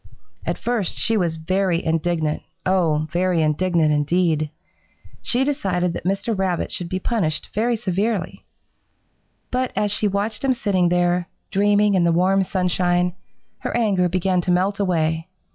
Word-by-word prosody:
"At - - -1
first 235 -6 -2
she 225 - +2
was 175 -6 0
very 180 +1 0
indignant, 160 -1 0 0.2
oh, 165 -5 +2
very 180 +1 +1
indignant, 155 0 +2
indeed! 155 +1 +1 0.7
She 245 +2 +1
decided 185 - 0
that - - -6
Mr. 200 +4 0
Rabbit 190 -3 -1
should 175 -1 -4
be 185 - -1
punished 185 -6 -1
very 235 +3 +1
severely. 210 -1 -2 1.1
But 255 0 0
as 210 -1 +1
she 210 +1 +2
watched 205 +3 -2
him 270 -1 +3
sitting 190 -7 +1
there, 175 0 +1 0.2
dreaming 205 +1 +3
in 185 -2 +3
the 170 - +3
warm 190 +3 +3
sunshine, 180 -1 +1 0.5
her - - -2
anger 195 -6 +2
began 185 +1 +1
to 180 - -4
melt 190 +3 +1
away. 165 -3 0
185 Hz, 145 wpm, -22 LUFS, 170-205 Hz, 1.1 s, him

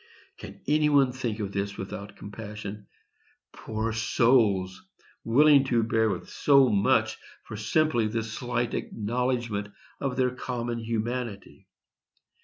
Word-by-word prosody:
Can - - -10
any 150 +1 +3
one 140 -3 +4
think 120 -4 -4
of 100 -2 -3
this 100 0 -3
without 100 +1 -7
compassion? 105 -1 -8 0.7
Poor 110 +1 -3
souls! 110 -4 +2 0.4
willing 140 +4 +5
to 120 -3 +2
bear 110 0 +2
with 95 -4 -4
so 140 -3 +4
much 100 -2 +2 0.2
for 110 - -8
simply 115 +2 +1
this 110 0 -3
slight 120 0 -2
acknowledgment 120 -2 -2 0.3
of 135 -3 -2
their 130 -1 +2
common 120 -2 -4
humanity. 115 -1 -4
115 Hz, 120 wpm, -27 LUFS, 105-125 Hz, 0.7 s, willing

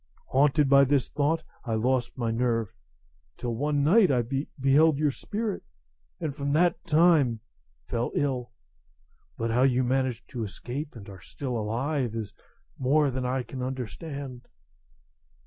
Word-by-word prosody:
Haunted 145 +2 +3
by 140 0 +7
this 140 -1 +2
thought, 155 +3 0 0.2
I 115 -3 -1
lost 120 +2 0
my 115 -2 -1
nerve, 115 -3 0 0.6
till 120 -1 -3
one 145 +4 0
night 190 +6 +5
I 125 -3 +2 0.4
beheld 140 +3 +4
your 150 -1 +2
spirit, 210 - -4 0.6
and 140 - -3
from 140 -1 -2
that 170 +2 +2
time 155 -8 +4 0.4
fell 120 - -2
ill. 130 -4 -1 0.9
But 115 0 -1
how 120 +2 +2
you 130 -1 +3
managed 130 -1 -1
to 120 -4 -4
escape, 125 - -6
and 105 -4 -10
are 95 -3 -11
still 130 -4 -5
alive, 120 +3 -1
is 110 -3 -5 0.5
more 140 +2 +3
than 130 0 -2
I 130 0 -1
can 125 +2 -7
understand." 130 +1 -6
130 Hz, 145 wpm, -27 LUFS, 120-145 Hz, 0.9 s, by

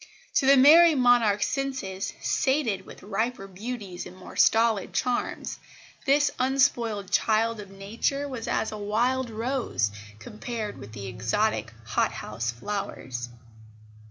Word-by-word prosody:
To 265 - +2
the 275 0 +7
"Merrie 320 +5 +8
Monarch's" 235 -5 +4
senses, 260 -9 -3
sated 265 -10 0
with - - -12
riper 215 +2 -2
beauties 195 -1 -6
and 185 - -13
more 185 - -12
stolid 225 -3 +3
charms, 250 -1 -2 0.5
this 285 +1 +4
unspoiled 240 -7 +1
child 225 +1 +2
of 200 -2 -9
nature 225 +9 -2
was 255 -5 -6
as 220 - 0
a 215 - -6
wild 240 +5 0
rose 225 - -1 0.3
compared 215 - -6
with 110 +2 -10
exotic 115 - -1
hot 110 - 0
house 115 +2 -4
flowers. 125 - -5
220 Hz, 125 wpm, -26 LUFS, 195-255 Hz, 0.5 s, Merrie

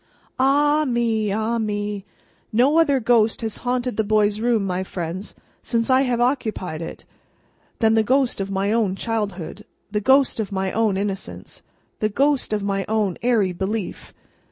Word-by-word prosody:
Ah 290 +3 +3
me, 230 -5 0
ah 220 +3 0
me! 205 -2 -3 0.5
No 265 +8 +4
other 285 -5 +3
ghost 225 -2 +2
has 220 -2 -3
haunted 250 -1 -2
the 220 - +2
boy's 210 0 +2
room, 230 -3 +1
my 185 -1 -1
friends, 185 +1 -5 0.3
since 230 +2 -1
I 260 +1 +5
have 250 -3 0
occupied 220 - -1
it, 165 - -8 0.7
than 225 -2 +3
the 225 - +4
ghost 255 0 +1
of 195 - -3
my 195 +1 0
own 215 -4 +1
childhood, 205 -6 -3 0.3
the 210 0 0
ghost 265 +2 +3
of 210 -3 -2
my 190 -1 -1
own 215 -3 +1
innocence, 195 -1 -5 0.4
the 215 - +1
ghost 275 +4 +1
of 210 -1 -1
my 195 -1 -1
own 210 -4 0
airy 225 -6 +2
belief. 195 +3 -4
220 Hz, 160 wpm, -22 LUFS, 200-245 Hz, 0.7 s, I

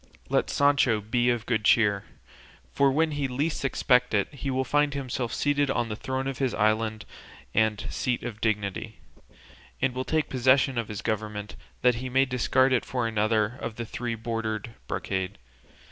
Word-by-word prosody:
Let - - +1
Sancho 140 -6 +3
be 120 +4 +1
of 120 -2 0
good 115 -3 0
cheer; 105 -3 +3 0.7
for 140 -1 +3
when 160 +3 +2
he 145 -2 -1
least 140 +4 -2
expects 125 -3 +2
it 100 +7 0
he 140 0 -4
will 130 0 0
find 145 +1 +1
himself 130 -3 -3
seated 145 -1 +1
on 120 -3 0
the 105 - -3
throne 130 +3 -3
of 135 -1 -4
his 130 -3 0
island 110 0 +1 0.5
and 110 -1 +1
seat 125 -1 -1
of 110 -2 -6
dignity, 105 -3 -2 0.8
and 130 -1 +1
will 130 +1 -2
take 155 +2 0
possession 130 0 +3
of 115 - -3
his 105 -2 -6
government 105 -1 -3 0.3
that 125 -1 +6
he 130 - -4
may 130 +2 +3
discard 130 +1 +2
it 125 - +2
for 125 -3 -2
another 110 +2 +1
of 115 -1 -4
three 120 0 -4
bordered 115 -1 -3
brocade. 95 -1 -3
120 Hz, 170 wpm, -27 LUFS, 110-130 Hz, 0.8 s, that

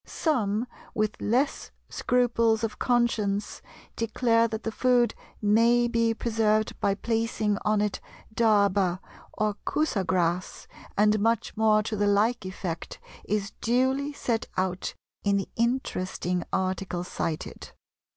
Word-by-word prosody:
Some, 230 - 0 0.3
with 215 -1 0
less 255 +6 0 0.2
scruples 230 -2 +1
of 225 - -3
conscience, 220 -5 0 0.3
declare 230 0 +2
that 220 0 -5
the 225 - -2
food 245 0 +3 0.3
may 230 +3 +4
be 230 -1 +1
preserved 220 -2 +1
by 195 - +1
placing 225 -1 -1
on 215 -1 +2
it 210 -2 -1 0.3
dharba 200 -5 +3 0.3
or 210 -1 -1
Kusa 300 -11 0
grass," 180 0 -1 0.3
and 210 +1 +4
much 230 +1 0
more 215 -1 +3
to 220 0 -3
the 205 0 +1
like 205 +1 +2
effect 185 -3 -5 0.3
is 205 -1 -1
duly 260 +4 +1
set 235 -5 -2
out 185 0 -1 0.3
in 200 -1 +2
the 195 - -3
interesting 185 -7 -1
article 185 -1 -1
cited. 165 -3 -4
215 Hz, 120 wpm, -27 LUFS, 200-235 Hz, 0.3 s, may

